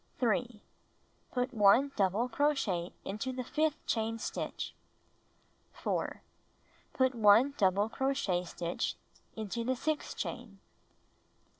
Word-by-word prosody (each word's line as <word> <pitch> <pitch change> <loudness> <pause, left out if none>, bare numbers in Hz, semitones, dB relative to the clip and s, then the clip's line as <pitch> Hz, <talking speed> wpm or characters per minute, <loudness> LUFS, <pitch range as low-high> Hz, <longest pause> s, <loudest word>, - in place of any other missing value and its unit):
3. 235 -1 0 0.7
Put 250 0 -1
1 230 +6 +5
double 200 +4 +2
cro 290 +5 +2
chet 180 -9 -1
into 215 +7 -3
the 255 0 -4
fifth 310 +4 -1
chain 225 0 0
stitch. - - -4 1.0
4. - - -3 0.7
Put 260 0 +2
1 225 +4 +5
double 200 -1 +3
cro 265 +4 0
chet 180 -9 0
stitch 170 0 -2 0.4
into 220 +2 -3
the 260 +2 0
sixth 300 +4 -2
chain. 230 -5 -5
230 Hz, 115 wpm, -32 LUFS, 205-260 Hz, 1.0 s, 1